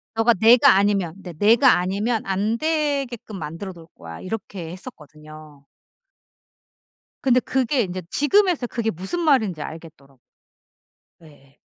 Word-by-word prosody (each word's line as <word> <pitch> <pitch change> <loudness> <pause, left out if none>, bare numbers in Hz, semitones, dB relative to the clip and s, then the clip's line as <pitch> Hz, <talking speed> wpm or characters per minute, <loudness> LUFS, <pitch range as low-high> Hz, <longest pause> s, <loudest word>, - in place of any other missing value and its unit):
너가 225 +1 +3
내가 225 +2 +6
아니면 195 -4 +1
"내 180 - -8
내가 230 - +4
아니면 205 +6 -1
안 200 +4 -1
되게끔 280 -9 -2
만들어 165 +5 -7
놓을 165 -1 -14
거야." 80 -1 -10
이렇게 185 -4 -7
했었거든요. 155 - -13 1.5
근데 255 -2 +3
그게 260 0 0
인제 185 -2 -4
지금에서야 345 -3 +2
그게 230 -2 -2
무슨 190 - -5
말인지 220 - +1
알겠더라 155 -4 -11 1.1
예예. 145 -3 -20
200 Hz, 285 characters per minute, -22 LUFS, 165-245 Hz, 1.5 s, 내가